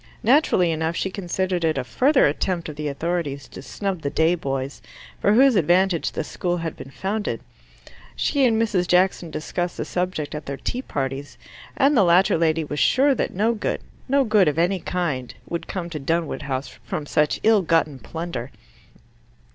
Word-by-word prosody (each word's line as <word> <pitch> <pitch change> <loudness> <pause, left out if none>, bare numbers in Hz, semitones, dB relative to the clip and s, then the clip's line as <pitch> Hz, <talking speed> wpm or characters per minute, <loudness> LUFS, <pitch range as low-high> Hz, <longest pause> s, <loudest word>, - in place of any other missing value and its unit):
Naturally 230 - +4
enough, 160 +1 -1
she 190 - -2
considered 185 -1 -2
it 160 -2 +1
a 130 - -1
further 265 - +3
attempt 170 +4 -1
of 155 - -7
the 150 0 -4
authorities 145 -2 -3
to - - -10
snub 190 +4 -4
the 140 - -1
day 160 +3 +2
boys, 135 -4 -3 0.4
for 205 - +3
whose 260 +2 +6
advantage 180 0 +2
the - - -2
school 175 +3 -2
had 165 -2 -4
been 135 - -10
founded. 205 +8 -3 0.8
She 285 -2 +1
and 225 -2 +3
Mrs. 200 -6 +1
Jackson 180 -1 +2
discussed 175 +3 -3
the - - -3
subject 180 -4 -2
at 150 -1 -6
their 140 0 -4
tea 250 - -3
parties, 135 - -4 0.4
and 285 +2 +4
the 215 - +5
latter 180 +2 +4
lady 160 -1 +2
was 145 -1 -4
sure 275 +2 +4
that - - -2
no 220 +5 +2
good, 215 - -2 0.3
no 275 +1 +4
good 215 -6 +4
of 150 0 +1
any 180 +3 +2
kind, 160 -9 -3
would 170 - -4
come 180 -3 -4
to 155 - -4
Dunwood 165 +3 -1
House 135 -1 -3 0.2
from 150 - -4
such 150 0 +1
ill 220 -2 +5
gotten 160 -5 +1
plunder. 165 -7 -5
170 Hz, 180 wpm, -23 LUFS, 150-195 Hz, 0.8 s, whose